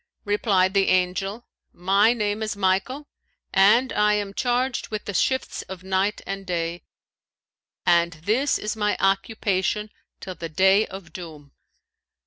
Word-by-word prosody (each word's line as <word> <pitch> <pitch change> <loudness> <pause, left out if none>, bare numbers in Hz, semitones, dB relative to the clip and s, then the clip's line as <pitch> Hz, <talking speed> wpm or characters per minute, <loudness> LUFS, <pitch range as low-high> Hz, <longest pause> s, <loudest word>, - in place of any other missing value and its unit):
Replied 200 -2 +2
the 195 -1 +3
Angel, 190 +5 0 0.3
'My 195 +5 +3
name 210 -2 -1
is 215 -1 -2
Michael, 200 +9 0 0.5
and 220 +7 +4
I 210 0 +3
am 205 -1 -3
charged 250 +3 -1
with 215 -1 -5
the 205 - -4
shifts 260 +8 0
of 185 -1 -8
night 190 +2 0
and 195 0 -5
day; 170 -2 -3 1.0
and 170 -1 +3
this 215 - 0
is 210 +1 -3
my 210 -1 0
occupation 195 +1 0 0.3
till 185 - -7
the 165 -2 -7
Day 190 +6 +3
of 190 -4 -10
Doom.' 155 -5 -10
195 Hz, 135 wpm, -24 LUFS, 185-215 Hz, 1.0 s, and